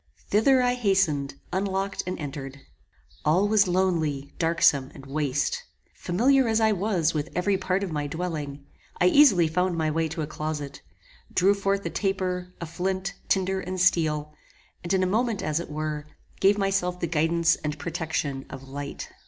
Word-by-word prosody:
Thither 255 Hz, +5 st, +4 dB
I 245 Hz, 0 st, +2 dB
hastened, 190 Hz, -, +1 dB, 0.2 s
unlocked 195 Hz, +1 st, -1 dB
and 185 Hz, -, -2 dB
entered. 140 Hz, -2 st, -7 dB, 0.6 s
All 175 Hz, +7 st, +3 dB
was 210 Hz, -2 st, +4 dB
lonely, 165 Hz, -7 st, 0 dB
darksome, 165 Hz, -5 st, +3 dB
and 135 Hz, -, -11 dB
waste. 145 Hz, -, -1 dB, 0.3 s
Familiar 250 Hz, +8 st, +2 dB
as 220 Hz, 0 st, +2 dB
I 220 Hz, -1 st, +4 dB
was 190 Hz, -5 st, +1 dB
with 155 Hz, 0 st, -2 dB
every 195 Hz, +3 st, +2 dB
part 190 Hz, +1 st, 0 dB
of 190 Hz, -, -4 dB
my 150 Hz, -1 st, -2 dB
dwelling, 150 Hz, -3 st, -4 dB, 0.3 s
I -, -, +4 dB
easily 185 Hz, -, +6 dB
found 180 Hz, +2 st, 0 dB
my 155 Hz, -1 st, +1 dB
way 165 Hz, +1 st, 0 dB
to 160 Hz, 0 st, -4 dB
a -, -, -1 dB
closet, 150 Hz, -2 st, -5 dB, 0.5 s
drew 195 Hz, +3 st, +4 dB
forth 200 Hz, 0 st, -1 dB
a -, -, -2 dB
taper, 185 Hz, -2 st, -2 dB
a 170 Hz, -, -4 dB
flint, 185 Hz, +3 st, -2 dB
tinder, 190 Hz, 0 st, +1 dB
and 185 Hz, 0 st, -4 dB
steel, 155 Hz, -4 st, +2 dB, 0.5 s
and, 175 Hz, -, -4 dB
in 190 Hz, -1 st, +3 dB
a -, -, +3 dB
moment 220 Hz, +3 st, 0 dB
as 155 Hz, +1 st, 0 dB
it 170 Hz, -, -6 dB
were, 150 Hz, 0 st, -4 dB, 0.3 s
gave 200 Hz, +1 st, +4 dB
myself 195 Hz, -3 st, 0 dB
the 175 Hz, -, -1 dB
guidance 165 Hz, +1 st, +2 dB
and 150 Hz, 0 st, -4 dB
protection 150 Hz, -3 st, -3 dB
of 135 Hz, 0 st, -9 dB
light. 140 Hz, +1 st, -6 dB
175 Hz, 170 wpm, -26 LUFS, 150-195 Hz, 0.6 s, easily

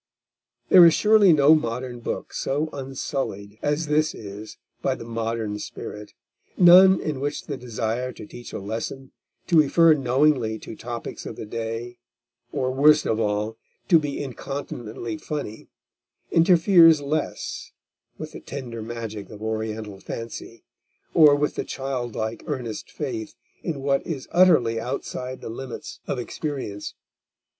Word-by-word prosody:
There 180 Hz, -, +9 dB
is 165 Hz, -1 st, +7 dB
surely 210 Hz, -3 st, +6 dB
no 150 Hz, -1 st, +6 dB
modern 125 Hz, -3 st, -1 dB
book 120 Hz, -, -5 dB
so 150 Hz, +3 st, -1 dB
unsullied 130 Hz, -6 st, -4 dB
as 150 Hz, +2 st, 0 dB
this 155 Hz, +1 st, +1 dB
is 105 Hz, 0 st, -9 dB, 0.2 s
by -, -, 0 dB
the -, -, -9 dB
modern 115 Hz, -2 st, -3 dB
spirit, 105 Hz, 0 st, -8 dB, 0.4 s
none 185 Hz, +1 st, +8 dB
in 150 Hz, -4 st, -3 dB
which 145 Hz, +2 st, -3 dB
the 145 Hz, -, -4 dB
desire 120 Hz, 0 st, -3 dB
to -, -, -10 dB
teach 120 Hz, +3 st, -10 dB
a -, -, -4 dB
lesson, 115 Hz, +6 st, -5 dB, 0.3 s
to 170 Hz, -3 st, +4 dB
refer 165 Hz, +3 st, +5 dB
knowingly 130 Hz, -4 st, +2 dB
to 110 Hz, -, -9 dB
topics 120 Hz, 0 st, -6 dB
of -, -, -6 dB
the -, -, -7 dB
day, 115 Hz, +2 st, -5 dB, 0.5 s
or 130 Hz, 0 st, -1 dB
worst 150 Hz, +3 st, +5 dB
of 110 Hz, -, 0 dB
all, 105 Hz, +1 st, -1 dB, 0.3 s
to 165 Hz, -, +7 dB
be 145 Hz, -2 st, -3 dB
incontinently 135 Hz, -1 st, -6 dB
funny, 145 Hz, -9 st, -6 dB, 0.6 s
interferes 165 Hz, -1 st, +6 dB
less 145 Hz, +2 st, -3 dB, 0.5 s
with -, -, -7 dB
the -, -, -9 dB
tender 120 Hz, -5 st, -7 dB
magic 110 Hz, -2 st, -6 dB
of 105 Hz, 0 st, -10 dB
Oriental 110 Hz, -2 st, -4 dB
fancy, 115 Hz, +2 st, -8 dB, 0.5 s
or 150 Hz, -3 st, +7 dB
with 145 Hz, +1 st, 0 dB
the -, -, -3 dB
childlike, 120 Hz, -4 st, -4 dB
earnest 125 Hz, -7 st, -4 dB
faith 125 Hz, -8 st, -5 dB, 0.3 s
in 155 Hz, -6 st, -4 dB
what 135 Hz, 0 st, +1 dB
is 145 Hz, -6 st, -4 dB
utterly 155 Hz, -11 st, +4 dB
outside 125 Hz, +2 st, -5 dB
the -, -, -6 dB
limits 125 Hz, +2 st, -7 dB
of -, -, -2 dB
experience. 125 Hz, -5 st, -5 dB
130 Hz, 140 wpm, -24 LUFS, 115-150 Hz, 0.6 s, There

